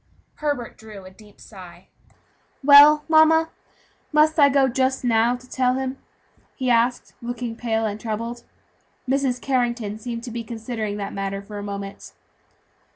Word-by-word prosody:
Herbert 285 -6 -4
drew 215 -3 -12
a 185 - -12
deep 205 +1 -19
sigh. 185 -3 -13 0.8
"Well, 290 +2 +8
mamma, 320 0 +4 0.6
must 310 +1 +3
I 285 -1 +7
go 275 -1 +3
just 260 +1 0
now, 235 0 +2
to 250 +1 -14
tell 255 -1 0
him?" 265 0 -4 0.6
he 255 -2 -1
asked, 240 +1 +1
looking 240 -1 -5
pale 225 -1 -1
and 210 0 -4
troubled. 230 +2 -4 0.7
Mrs. 265 -2 0
Carrington 240 -5 -2
seemed 235 0 -6
to 240 - -7
be 235 0 -5
considering 225 -2 -5
the 200 -1 -5
matter 195 0 -4
for 205 0 -8
a - - -6
moment. 200 -1 -7
240 Hz, 150 wpm, -22 LUFS, 215-265 Hz, 0.8 s, Well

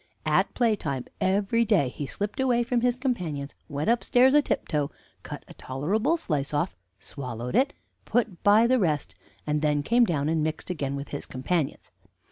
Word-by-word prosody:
At - - +2
playtime 190 - 0
every 200 +4 +2
day 205 - +3
he 140 +2 -5
slipped 205 - -4
away 245 -2 +3
from 240 0 0
his 245 0 +2
companions, 175 - -3 0.2
went 145 0 -3
upstairs 245 +2 +4
a 295 - +7
tiptoe, 150 - -1 0.3
cut - - -8
a - - -11
tolerable 210 - 0
slice 150 - -2
off, 145 -10 0 0.2
swallowed 125 - -6
it, 270 +4 +4 0.3
put 225 -7 0
by 210 +3 +6
the 255 +1 +3
rest, 155 -7 0 0.3
and 150 0 0
then 150 -1 +1
came 240 +7 +4
down 150 -7 0
and 160 0 +1
mixed 155 +3 -3
again 140 -5 -2
with 140 +1 -6
his 145 - -5
companions. 135 +3 -2
180 Hz, 170 wpm, -27 LUFS, 145-235 Hz, 0.3 s, a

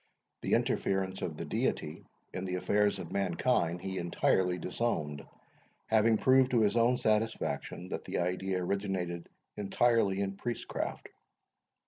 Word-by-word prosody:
The - - -1
interference 95 -1 0
of 80 -3 -3
the - - -4
Deity - - -2 0.3
in 90 - -3
the 90 -1 -2
affairs 105 +3 +2
of - - -7
mankind 90 -2 +1
he 95 -1 -3
entirely 90 +1 +1
disowned, 80 -6 -2 0.6
having 110 0 +4
proved 130 +1 +5
to 120 -3 +3
his 105 0 +3
own 120 +2 +4
satisfaction 110 -4 -1
that - - -5
the - - -3
idea 90 +1 -1
originated 90 -3 -2 0.3
entirely 105 -1 +2
in 100 0 -2
priestcraft. 120 +2 -4
95 Hz, 130 wpm, -31 LUFS, 90-110 Hz, 0.6 s, proved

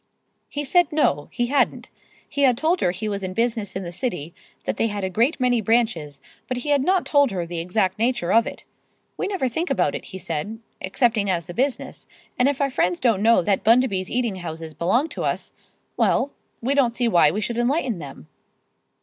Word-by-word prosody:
He 290 - -3
said 350 +3 +3
no, 145 - +1
he 240 - 0
hadn't. 275 +4 0 0.4
He 285 - -3
had 255 -4 +4
told 335 +5 +1
her - - +3
he 190 +5 -3
was 200 -1 -2
in 185 -1 -5
business 230 -4 -1
in 190 - -3
the 170 - -6
city, 175 - -4 0.3
that - - -3
they 225 - +2
had 205 -2 -4
a 190 - -2
great 235 - +1
many 245 -2 +2
branches, 205 - 0 0.3
but 255 - -2
he 250 +4 -4
had 285 -2 +3
not 370 +3 +2
told 285 -2 +4
her 180 -4 -3
the 170 0 -5
exact 185 +3 0
nature 230 -6 +1
of 230 0 +4
it. - - -7 0.5
'We - - -2
never 385 -10 -1
think 320 +9 -2
about - - +1
it,' - - -5
he 190 - -8
said 170 +5 -4 0.2
'excepting 215 +1 +1
as 170 -3 0
the 175 - -8
business; 265 +4 -2 0.3
and 250 +2 +5
if 285 0 -2
our 275 -1 +1
friends 180 -9 +1
don't 230 -6 +2
know 225 -3 +5
that 195 +2 +1
Bundaby's 220 -5 +3
Eating 235 -5 -1
Houses 160 -2 -7
belong 185 - +1
to - - -5
us, - - -2 0.4
well, 280 - +2 0.3
we 265 +4 +2
don't 250 -5 +2
see 245 -1 +1
why 175 -8 +5
we 200 - -2
should 235 +2 -2
enlighten 245 - 0
them. 135 - -10
225 Hz, 210 wpm, -23 LUFS, 185-255 Hz, 0.5 s, and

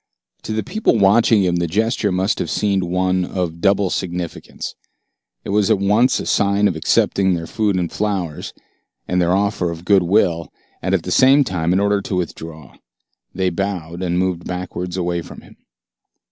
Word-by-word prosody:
To - - -6
the 110 -1 -1
people 210 - +1
watching 105 +1 +4
him 90 -1 +1
the 85 0 0
gesture 110 +3 0
must 95 +4 0
have - - -2
seemed 100 -2 0
one 90 +1 0
of 90 -2 -4
double 100 -2 +2
significance. 90 -2 -5 0.7
It - - -8
was 105 -1 +2
at - - +4
once 105 +6 +2
a - - -5
sign 100 0 +2
of 95 - -1
acceptance 95 +4 +1
of 95 - +3
their 85 -1 -4
food 105 +1 -1
and 90 -2 -1
flowers, 95 -7 -3 0.6
and 90 0 +1
their 85 +1 +2
offer 100 -3 0
of 85 +1 -7
good 100 -1 +4
will, 85 -4 +1 0.3
and - - +1
at - - -1
the - - -5
same 135 +2 +5
time 90 -8 -1
an 95 - +3
order 100 0 +1
to 95 - -4
withdraw. 80 -4 -6 0.6
They 95 0 0
bowed, 90 -2 -4
and 90 -1 -1
moved 90 -2 -1
backwards 90 0 -5
away 85 -1 -1
from - - -11
him. - - -18
95 Hz, 185 wpm, -19 LUFS, 85-100 Hz, 0.7 s, same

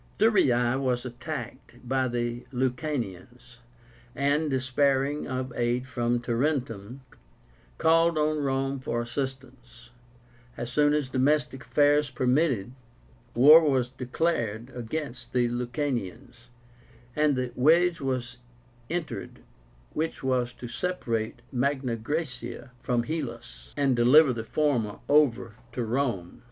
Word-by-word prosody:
Thurii 135 - +3
was 125 -2 0
attacked 125 -1 -7
by 130 0 +1
the 120 0 -3
Lucanians, 125 - -4 0.6
and, 145 +2 +1
despairing 135 +2 +1
of 130 -1 -4
aid 120 +1 0
from 120 -1 -1
Tarentum, 120 -2 -2 0.8
called 165 0 +3
on 155 0 +1
Rome 135 -1 -1
for 120 -2 -2
assistance. 125 -1 -6 0.7
As 120 0 -5
soon 145 +3 +3
as 150 -3 0
domestic 140 +1 +1
affairs 145 0 +3
permitted, 125 -3 +1 0.6
war 150 +7 +9
was 135 -5 +1
declared 125 -4 -2
against 125 +2 -5
the 125 -1 +3
Lucanians, 120 - -4 0.7
and 150 -2 +3
the 125 -1 -2
wedge 165 +6 +3
was 130 -2 -3 0.5
entered 170 0 -5 0.5
which 160 -2 -3
was 125 -2 0
to 120 - -8
separate 120 -6 -3
Magna 130 -1 0
Graecia 130 +1 -5
from 120 -2 0
Hellas, 115 - -6
and 140 -3 +2
deliver 130 +4 +6
the 115 -1 -4
former 120 -6 0
over 130 -6 +2 0.2
to 125 - -2
Rome. 115 -7 -2
130 Hz, 110 wpm, -27 LUFS, 120-145 Hz, 0.8 s, war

